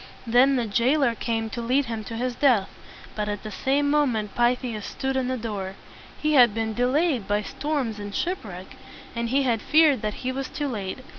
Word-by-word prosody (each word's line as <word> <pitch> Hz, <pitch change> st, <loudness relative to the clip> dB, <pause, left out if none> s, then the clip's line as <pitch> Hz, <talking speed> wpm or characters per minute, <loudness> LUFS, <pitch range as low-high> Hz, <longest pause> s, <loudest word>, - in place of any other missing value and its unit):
Then 250 Hz, +4 st, +4 dB
the 245 Hz, -2 st, 0 dB
jailer 240 Hz, +5 st, +2 dB
came 225 Hz, -1 st, -2 dB
to 235 Hz, -, -4 dB
lead 255 Hz, +4 st, +1 dB
him 225 Hz, -2 st, -4 dB
to 230 Hz, -, -6 dB
his 250 Hz, +2 st, -2 dB
death; 240 Hz, -7 st, +3 dB, 0.5 s
but 210 Hz, -1 st, -2 dB
at 205 Hz, -1 st, -4 dB
the 215 Hz, -, -6 dB
same 275 Hz, +7 st, +1 dB
moment 255 Hz, -8 st, +1 dB
Pythias 240 Hz, -2 st, 0 dB
stood 265 Hz, +4 st, -3 dB
in 260 Hz, -1 st, 0 dB
the 255 Hz, 0 st, -1 dB
door. 200 Hz, -4 st, -4 dB, 0.4 s
He 305 Hz, 0 st, +1 dB
had 240 Hz, -6 st, +6 dB
been 225 Hz, -1 st, -1 dB
de 245 Hz, +2 st, +1 dB
layed 285 Hz, -, +1 dB
by 205 Hz, +1 st, +1 dB
storms 270 Hz, -5 st, -3 dB
and 205 Hz, -1 st, -6 dB
ship 365 Hz, +2 st, -1 dB
wreck, 185 Hz, -3 st, -9 dB, 0.4 s
and 235 Hz, 0 st, -2 dB
he 275 Hz, +3 st, +2 dB
had 235 Hz, -4 st, +1 dB
feared 305 Hz, -3 st, +4 dB
that 210 Hz, -1 st, -2 dB
he 255 Hz, -, +1 dB
was 265 Hz, 0 st, -4 dB
too 290 Hz, -, -3 dB
late. 210 Hz, -2 st, -4 dB
240 Hz, 210 wpm, -25 LUFS, 215-270 Hz, 0.5 s, had